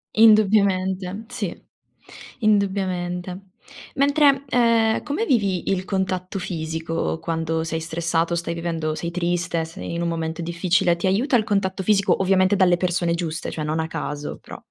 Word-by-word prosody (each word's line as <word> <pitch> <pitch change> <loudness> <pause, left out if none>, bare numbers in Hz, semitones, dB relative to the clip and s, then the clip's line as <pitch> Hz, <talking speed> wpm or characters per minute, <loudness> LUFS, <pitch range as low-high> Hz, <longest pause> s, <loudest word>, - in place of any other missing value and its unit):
Indubbiamente, 200 -2 +3
sì, 225 -7 -5 0.8
indubbiamente. 190 -4 0 0.5
Mentre, 280 -1 +3
ehm, 230 -3 +3
come 300 +10 -2
vivi 200 - +1
il 185 -1 -1
contatto 190 -1 -2
fisico 165 -2 -3
quando 165 -1 -2
sei 160 0 -3
stressato, 165 +1 -1
o - - +2
stai 170 0 -3
vivendo 165 -2 -2
sei 170 +1 -4
triste, 170 -1 -1
sei 165 +1 -7
in 170 - -2
un 170 - 0
momento 165 0 -3
difficile, 170 +1 +1
ti 170 - -4
aiuta 220 +9 +2
il 220 - +1
contatto 195 -2 -1
fisico? 200 0 +2
Ovviamente 190 +1 +3
dalle 185 -3 +4
persone 175 -1 0
giuste, 170 -1 -3
cioè 155 - -4
non 155 +1 -1
a 160 - -1
caso, 150 -2 -5
però - - -10
180 Hz, 150 wpm, -22 LUFS, 165-200 Hz, 0.8 s, dalle